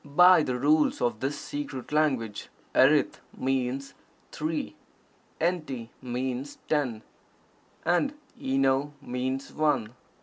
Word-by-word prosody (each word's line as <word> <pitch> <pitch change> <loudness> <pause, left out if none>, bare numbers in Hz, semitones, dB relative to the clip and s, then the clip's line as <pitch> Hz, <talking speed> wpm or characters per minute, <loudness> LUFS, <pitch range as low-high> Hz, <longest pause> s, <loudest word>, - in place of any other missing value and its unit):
By 180 +4 +7
the 125 -4 -1
rules 150 +4 +3
of 120 -3 0
this 140 +4 -2
secret 145 -3 -6
language 130 -9 0 0.2
erith - - +4 0.2
means 135 +1 -1 0.4
"three," 155 - -3 0.6
enty 155 -9 -1
means 130 +2 -3
"ten," 130 -8 0 0.8
and 225 +12 +2 0.2
eno 135 +2 +1
means 130 +2 -3
"one." 150 -8 +1
135 Hz, 100 wpm, -28 LUFS, 125-150 Hz, 0.8 s, By